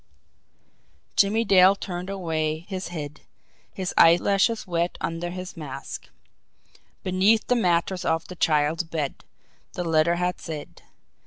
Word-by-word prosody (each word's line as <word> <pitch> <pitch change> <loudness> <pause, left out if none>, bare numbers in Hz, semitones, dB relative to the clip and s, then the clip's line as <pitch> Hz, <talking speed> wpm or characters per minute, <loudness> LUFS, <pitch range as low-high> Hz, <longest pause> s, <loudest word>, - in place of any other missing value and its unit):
Jimmie 215 +3 +3
Dale 190 -1 +6
turned 180 -1 -6
away 160 -4 -2
his 190 -2 -4
head 150 -3 -7 0.5
his 185 -2 -4
eyelashes 195 +6 +4
wet 170 -1 -1
under 165 +1 -3
his 185 +1 -7
mask. 140 -4 -7 0.9
"BENEATH 195 +4 +3
THE 250 - +2
MATTRESS 180 -3 +1
OF 165 0 0
THE 180 - -9
CHILD'S 155 0 +1
BED," 155 -4 -4 0.5
the 180 - -3
letter 165 0 +3
had 180 +1 -2
said. 155 -3 -7
175 Hz, 125 wpm, -25 LUFS, 160-190 Hz, 0.9 s, Dale